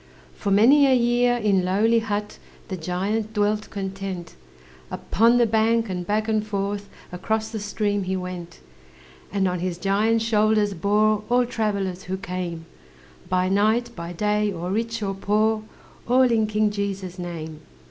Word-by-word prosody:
For - - -4
many 255 +9 +6
a 260 - +5
year, 245 0 +2
in 200 -5 +2
lowly 215 +5 +3
hut, 210 -2 -4 0.3
The 190 - -3
giant 195 +6 -2
dwelt 210 0 0
content 195 -3 -5 0.6
Upon 230 +3 +2
the 240 - +4
bank, 225 0 +2
and 180 -1 -4
back 215 +1 0
and 215 -1 +1
forth 200 -1 -3 0.2
Across 220 +5 -2
the 220 - -4
stream 205 -1 -1
he 190 +1 -1
went; 180 - -7 0.7
And 195 -1 +1
on 180 -1 -1
his 180 -1 -3
giant 210 +4 +1
shoulders 215 -2 +2
bore 210 +4 +2
All 245 0 +3
travellers 200 -6 -2
who 190 +1 -3
came, 180 -3 -5 0.6
By 185 0 +1
night, 220 +5 +1
by 170 0 -6
day, 210 +3 0
or 175 0 -4
rich 225 +1 -2
or 195 -1 -1
poor, 215 +3 +1 0.5
All 255 +2 +5
in 230 -4 +2
King 215 0 +1
Jesus' 195 -3 -4
name. 160 -3 -6
205 Hz, 155 wpm, -24 LUFS, 185-220 Hz, 0.7 s, many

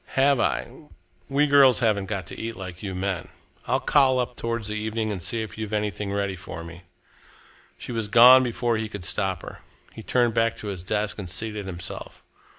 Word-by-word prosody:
"Have 135 0 +4
I? 130 +7 -2 0.4
We 140 +2 +3
girls 140 -4 +6
haven't 105 -5 +1
got 95 -3 -3
to - - -7
eat 115 0 -5
like 90 -2 -8
you 95 -3 -5
men. 95 -1 -2 0.4
I'll - - +2
call 135 -3 +3
up 125 -1 -2
towards 115 -2 -3
the - - -2
evening 110 +1 -2
and 95 -4 -4
see 115 +6 -1
if 110 - -9
you've 110 -1 -4
anything 105 -1 -2
ready 100 -1 -1
for 90 -1 -8
me." 85 +1 -11 0.9
She - - -8
was 115 -3 -2
gone 125 +4 +8
before 120 -1 0
he 110 0 -3
could 100 -3 -7
stop 95 0 -1
her. - - -9 0.3
He - - -9
turned 120 +1 +1
back 115 0 +1
to 105 - -6
his 95 -3 -5
desk 105 +2 -2
and 95 -3 -6
seated 105 +1 -5
himself. 90 -2 -7
110 Hz, 200 wpm, -25 LUFS, 95-120 Hz, 0.9 s, gone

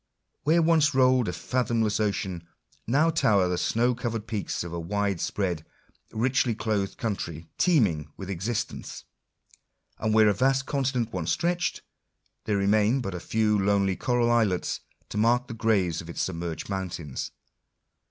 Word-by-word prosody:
Where 165 +3 +4
once 160 -3 +3
rolled 130 -2 +4
a - - 0
fathomless 110 +3 0
ocean, 95 -5 -2 0.4
now 150 +8 +3
tower 105 - +3
the 90 - 0
snow 120 +2 +2
covered 115 -3 -3
peaks 110 -6 -3
of 85 -1 -7
a 85 - -3
wide 100 +1 -1
spread, 90 -6 -1 0.5
richly 125 +1 +1
clothed 105 -2 -1
country, 85 -7 -4
teeming 100 - +2
with 95 - -7
exist 100 +5 -2
ence; - - -8 1.0
and 110 - 0
where 110 0 +6
a 105 - +4
vast 135 +5 +2
continent 130 -5 -1
once - - -1
stretched, 175 +1 0 0.6
there 105 -2 +1
re 100 - 0
main 105 +5 +3
but 100 -6 -4
a 90 - -4
few 105 +3 +1
lonely 100 -1 +2
coral 120 +1 +1
islets 110 -6 +1 0.3
to 105 - -3
mark 120 +3 +3
the - - -6
graves 100 -8 +1
of 85 - -11
its - - -2
submerged 85 -3 -4
mountains. 90 -8 -4
110 Hz, 155 wpm, -27 LUFS, 95-125 Hz, 1.0 s, where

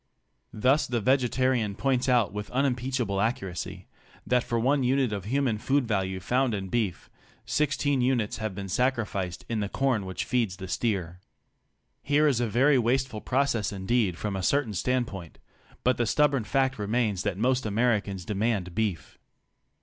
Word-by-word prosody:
Thus 130 +7 +2
the 120 -1 0
vegetarian 125 -2 +1
points 130 +1 0
out 120 -6 +3
with 105 0 -5
unimpeachable 125 -5 0
accuracy 95 -4 -3 0.4
that 125 -1 +2
for 115 - -1
one 135 +4 +2
unit 130 -2 +1
of 100 -3 -4
human 125 -2 0
food 135 +1 +1
value 95 -3 -1
found 125 +4 +1
in 95 -2 -5
beef, 110 -6 -1 0.4
sixteen 145 -2 +1
units 125 -4 0
have 110 -4 -4
been 100 0 -5
sacrificed 105 -5 -1
in 115 -2 -2
the 100 -2 -2
corn 125 -7 0
which 95 - -4
feeds 115 -7 0
the 95 -1 -7
steer. 90 -4 -2 0.8
Here 145 +2 +3
is 135 -5 +2
a 120 - +1
very 130 +5 +4
wasteful 120 -1 0
process 130 -5 0
indeed 100 -1 0
from 105 0 -3
a 95 - -2
certain 135 +2 +1
standpoint, 100 -5 -2 0.5
but 125 0 +2
the 120 - 0
stubborn 140 -2 +2
fact 135 0 0
remains 105 -2 0
that 100 -2 -2
most 125 +2 +1
Americans 105 -4 0
demand 105 -3 -1
beef. 105 -5 -3
115 Hz, 155 wpm, -27 LUFS, 100-130 Hz, 0.8 s, very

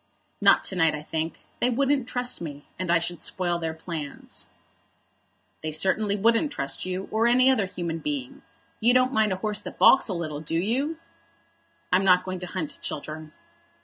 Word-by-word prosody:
"Not - - +6
to 190 - -2
night, 165 -4 +3
I 150 - -7
think. 160 +1 -4 0.2
They 245 - +2
wouldn't 270 +1 +1
trust 245 -4 -1
me, 145 -3 -7
and 185 -2 -3
I 170 - +5
should 170 +1 -3
spoil 175 -2 -1
their 160 -1 -3
plans." 160 -3 -7 1.1
"They 155 - -3
certainly 200 +6 +2
wouldn't 230 +8 +2
trust 185 - -3
you, 185 +1 -3
or 225 +2 +2
any 255 +2 +5
other 220 -7 +1
human 170 -3 -4
being. 145 -4 -4 0.4
You 240 +3 +4
don't 255 +1 +3
mind 220 -3 +3
a - - +1
horse 210 -1 0
that - - -9
baulks 270 - +6
a - - -1
little, 155 -4 -4
do 160 +1 -4
you?" 260 - 0 0.9
"I'm 185 +2 +4
not 180 -1 +5
going 185 -1 -4
to 180 - -5
hunt, 170 -4 -5
Chiltern." 155 +1 -6
185 Hz, 180 wpm, -26 LUFS, 160-230 Hz, 1.1 s, Not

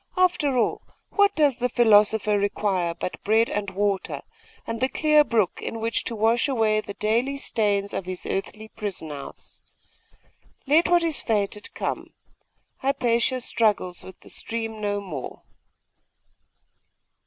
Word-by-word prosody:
After 345 -7 +2
all, 240 - +1 0.3
what 405 -1 +3
does 290 -5 +3
the 250 +1 +1
philosopher 215 -3 +4
require 195 -4 0
but 175 - -6
bread 220 +2 +3
and 205 -1 -2
water, 195 0 -2 0.4
and 230 +1 -4
the 260 - +2
clear 305 0 +4
brook 225 -9 0
in 230 - -4
which 225 0 -1
to 230 - -2
wash 225 +4 +2
away 220 -5 +2
the 200 -1 -8
daily 235 +6 0
stains 205 -6 0
of 190 - -3
his 185 -1 -4
earthly 215 +3 -4
prison 195 -9 -6
house? 140 -1 -10 1.0
Let 310 +5 +4
what 350 -1 +4
is 325 -3 -1
fated 210 -1 -1
come. - - -4 0.6
Hypatia 255 -2 +1
struggles 210 -7 0
with 190 - -12
the - - -15
stream 225 -1 -4
no 205 -1 -1
more! 155 -10 -7
220 Hz, 140 wpm, -25 LUFS, 200-250 Hz, 1.0 s, philosopher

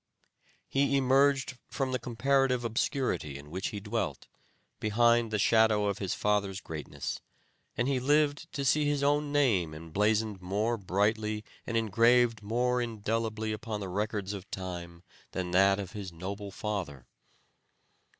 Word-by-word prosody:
He 140 0 +2
emerged 135 -1 +3
from 135 -2 -2
the 130 - 0
comparative 130 +1 +1
obscurity 110 - -1
in 75 +1 -12
which 95 +3 -2
he 105 - -4
dwelt, 100 - -3 0.5
behind 115 +2 +3
the 110 - 0
shadow 110 0 +4
of 100 0 -1
his 95 -3 -2
father's 100 -2 0
greatness, 80 -4 -5 0.6
and 120 - +1
he 135 -2 +1
lived 145 +3 +2
to 140 - -2
see 150 +3 +3
his 145 -1 +1
own 145 +1 +2
name 105 - +2
emblazoned 105 +5 0
more 105 +6 0
brightly 105 +2 0 0.2
and 115 - 0
engraved 115 +1 +3
more 125 +4 +1
indelibly 110 -1 -2
upon 110 0 -4
the 100 -2 -5
records 105 0 -2
of 100 -1 -8
time 85 -2 -6 0.3
than 90 -2 -3
that 95 +2 +5
of 95 -3 -5
his 100 -4 -6
noble 100 +4 -6
father. 95 - -4
110 Hz, 140 wpm, -30 LUFS, 95-125 Hz, 0.6 s, that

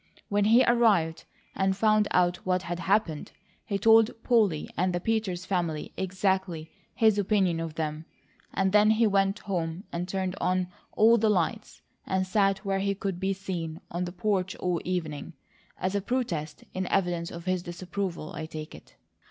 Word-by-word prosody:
When 205 0 +2
he 230 +4 +6
arrived, 205 -9 +3 0.3
and 190 0 0
found 215 0 +3
out 180 0 +2
what 185 0 -1
had 175 -1 -4
happened, 185 -4 0 0.3
he 200 - 0
told 225 +2 +6
Polly 210 -11 +2
and 180 0 +1
the 175 - 0
Peters 190 -3 -1
family 170 -5 -2
exactly 190 -3 -1 0.2
his 220 -3 +4
opinion 190 -4 +2
of 165 -2 -5
them; 155 0 -3 0.5
and 190 -1 +1
then 210 +1 +5
he 220 +1 +4
went 195 -1 +2
home 175 -3 -3
and 175 +1 -3
turned 190 -1 -2
on 185 0 +1 0.2
all 225 +2 +5
the 220 0 +3
lights, 210 +3 -1 0.2
and 190 0 0
sat 195 +1 +1
where 195 0 0
he 200 0 0
could 195 -2 -3
be 190 +1 0
seen 175 -5 -5
on 175 +1 -2
the 175 - -5
porch 190 0 -1
all 180 -2 -1
evening, 165 -5 -3 0.5
as 185 +1 -1
a 200 - 0
protest 185 -11 -3
in 185 0 -2
evidence 175 -3 0
of 170 0 -9
his 185 -1 0
disapproval, 175 -1 -5
I 160 - -5
take 155 -1 -7
it." - - -15
185 Hz, 170 wpm, -28 LUFS, 175-205 Hz, 0.5 s, he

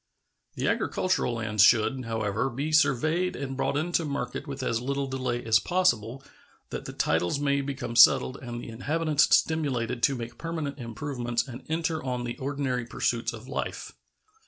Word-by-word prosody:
The - - -1
agricultural 185 -9 0
lands 105 -2 0
should, 120 +4 +4
however, 110 +2 -1
be 140 +5 -3
surveyed 155 +5 +2
and 135 -1 -4
brought 140 - 0
into 170 +2 0
market 145 0 -4
with 135 -1 -5
as 115 -2 0
little 140 +2 -1
delay 130 -3 -3
as 110 -1 +5
possible, 135 - 0 0.5
that - - -5
the - - -5
titles 85 - +1
may 140 -1 +1
become 135 -4 -5
settled 130 +2 +6
and 120 -2 -6
the 120 - -8
inhabitants 150 +5 +1
stimulated 130 -7 -1
to 140 +1 +3
make 120 -1 -7
permanent 160 -4 -4
improvements 120 0 -3
and 125 -1 -8
enter 160 -1 -1
on 125 -2 -2
the 120 0 -4
ordinary 130 -3 -2
pursuits 120 -1 -1
of 115 +2 -10
life. 135 - -4
130 Hz, 160 wpm, -27 LUFS, 120-145 Hz, 0.5 s, settled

